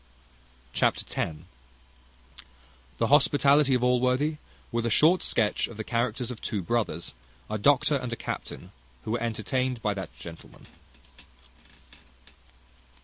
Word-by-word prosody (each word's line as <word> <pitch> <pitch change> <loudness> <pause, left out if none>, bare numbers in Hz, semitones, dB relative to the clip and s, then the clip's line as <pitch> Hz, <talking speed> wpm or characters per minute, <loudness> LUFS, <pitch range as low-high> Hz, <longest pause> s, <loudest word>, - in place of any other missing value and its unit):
Chapter 65 - +1 0.2
x. 80 - -2 1.6
The 115 - +1
hospitality 140 +1 +4
of 125 - 0
Allworthy; 125 +5 +2 0.3
with 115 0 -1
a - - +1
short 165 +10 +5
sketch 105 -3 +1
of 115 - -11
the 110 - -3
characters 120 +2 -1
of 120 - -8
two 100 -5 -3
brothers, 105 -5 -2 0.4
a 110 - -1
doctor 145 +5 +4
and 125 -2 -5
a - - -1
captain, - - -6 0.3
who - - -4
were 120 0 -1
entertained 125 +2 -1
by 105 - +1
that 95 -3 -6
gentleman. 85 +5 -12
120 Hz, 125 wpm, -27 LUFS, 110-130 Hz, 1.6 s, short